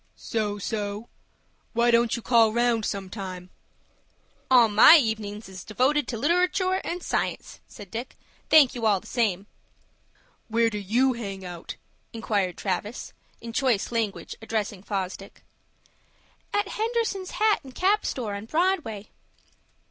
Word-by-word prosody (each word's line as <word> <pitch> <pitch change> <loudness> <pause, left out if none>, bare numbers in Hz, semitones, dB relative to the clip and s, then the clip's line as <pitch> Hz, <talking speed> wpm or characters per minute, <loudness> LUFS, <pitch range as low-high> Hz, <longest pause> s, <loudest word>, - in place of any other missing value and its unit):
"So 210 -2 -3
so. 205 +1 -4 0.6
Why 235 +1 +3
don't 235 -1 +3
you 235 - -7
call 230 -3 +4
round, 235 -1 +1
some 195 -1 -3
time?" 185 -2 -7 1.0
"All 245 -3 +7
my 220 +10 +8
evenin's 220 -5 -2
is 190 -1 -9
devoted 260 +7 +1
to 235 - -4
literatoor 365 - +1
and 350 +1 -4
science," - - -3
said 200 -3 -12
Dick. 235 +3 -6 0.3
"Thank 295 -5 +6
you 235 -4 -1
all 205 -3 +3
the - - -21
same." 205 -6 0 1.0
"Where 230 0 +2
do 210 - -3
you 240 +7 +2
hang 195 -5 -6
out?" 175 -2 -7 0.4
inquired 205 -5 -1
Travis, 205 +4 -4 0.3
in 230 0 -8
choice 240 -6 +1
language, 225 -4 -2
addressing 215 -3 -3
Fosdick. 195 -1 -5 1.1
"At 410 -1 0
Henderson's 445 -4 -2
hat 425 -5 +2
and 265 -2 -13
cap 405 +3 +2
store, 225 -6 -3
on 200 +1 -6
Broadway." 315 - -1
225 Hz, 135 wpm, -26 LUFS, 205-265 Hz, 1.1 s, my